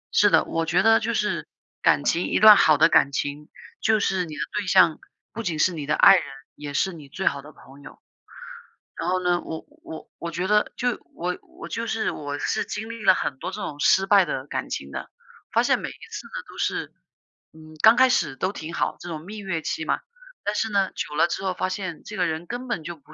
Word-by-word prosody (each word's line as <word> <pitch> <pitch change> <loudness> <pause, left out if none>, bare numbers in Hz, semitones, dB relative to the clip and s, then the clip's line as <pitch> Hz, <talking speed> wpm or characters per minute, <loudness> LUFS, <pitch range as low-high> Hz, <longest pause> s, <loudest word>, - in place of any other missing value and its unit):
是 - - +6
的， - - +4
我 165 - -1
觉 180 +3 +2
得 225 0 +6
就 230 0 -2
是 210 -1 -1 0.3
感 - - +3
情 170 - +1
一 - - +1
段 215 -1 +10
好 155 -6 +5
的 160 +3 +6
感 140 - +4
情， 145 +2 -4 0.3
就 220 -1 +3
是 190 -2 0
你 155 -2 -8
的 - - -5 0.2
对 200 - -5
象， 185 -4 +5 0.3
不 230 - -5
仅 170 -7 -2
是 180 +3 +2
你 145 -3 -6
的 150 - +2
爱 195 - +8
人， 180 - +1 0.3
也 145 -1 -8
是 190 +3 +1
你 150 -4 -12
最 190 +6 -5
好 140 - +1
的 150 - -13
朋 140 -1 -17
友。 - - -13 1.0
然 - - -3
后 185 0 +1
呢？ 175 -1 +1
我 160 - -7 0.2
我 160 - -9
我 170 - -4
觉 180 +4 -2
得 210 0 +2
就 245 -1 0 0.2
我 180 +1 -2
我 - - -12
就 230 0 -4
是 225 0 -1
我 145 -1 -5
是 - - -1
经 220 +1 -5
历 230 -1 -7
了 190 - +7
很 135 - -3
多 - - -4
这 - - -7
种 145 -1 -6
失 190 +4 +4
败 200 -1 +6
的 135 -5 -4
感 - - -4
情 70 0 -5
的， - - -6 0.4
发 - - +3
现 - - +3
每 - - -5
一 - - -9 0.2
次 - - -7
呢 - - -21 0.2
都 - - -13
是， - - -2 0.6
嗯， 155 0 -15
刚 220 +2 +8
开 260 0 +7
始 150 - +1
都 190 - -1
挺 160 -3 -7
好， - - -1
这 175 - -8
种 160 -2 -5
蜜 210 +3 -8
月 190 -5 -3
期 160 - -3
嘛。 - - 0 0.5
但 205 - 0
是 225 - 0
呢， 195 -2 +1
久 150 - -5
了 160 - +4
之 175 - -4
后 190 - 0
发 185 - -1
现 185 -4 -5
这 210 - -8
个 180 -2 +1
人 160 +2 -4
根 245 +1 -5
本 165 -9 -2
就 170 +1 -6
不 155 +1 -19
180 Hz, 260 characters per minute, -24 LUFS, 155-205 Hz, 1.0 s, 段